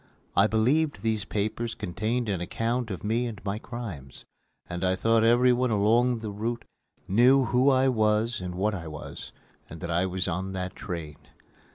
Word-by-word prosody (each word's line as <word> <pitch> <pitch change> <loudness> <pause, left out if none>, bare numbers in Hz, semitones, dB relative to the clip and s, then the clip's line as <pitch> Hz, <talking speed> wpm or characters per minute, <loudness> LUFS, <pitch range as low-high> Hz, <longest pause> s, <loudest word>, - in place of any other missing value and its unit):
I - - +5
believed 135 +9 +1
these 110 -3 0
papers 110 +3 -2
contained 110 +7 -2
an 95 -4 -1
account 115 +6 -2
of 95 -5 -5
me 115 +4 0
and 110 -4 -6
my 100 +1 -2
crimes, 100 - -8 0.4
and 85 +1 -4
I 95 0 +2
thought 115 +3 +3
everyone 125 +2 +4
along 115 +3 +2
the 110 -2 -4
route 115 +4 -3 0.4
knew 125 +6 +5
who 125 +3 +3
I 130 0 +4
was 110 -2 +1
and 90 -1 -5
what 105 +4 0
I 85 -4 -5
was, 75 -1 -8 0.4
and 80 - -9
that 85 +2 -4
I 90 +3 +1
was 95 0 -1
on 95 +2 -3
that 95 0 -4
train. 85 -7 -6
110 Hz, 175 wpm, -27 LUFS, 95-120 Hz, 0.4 s, I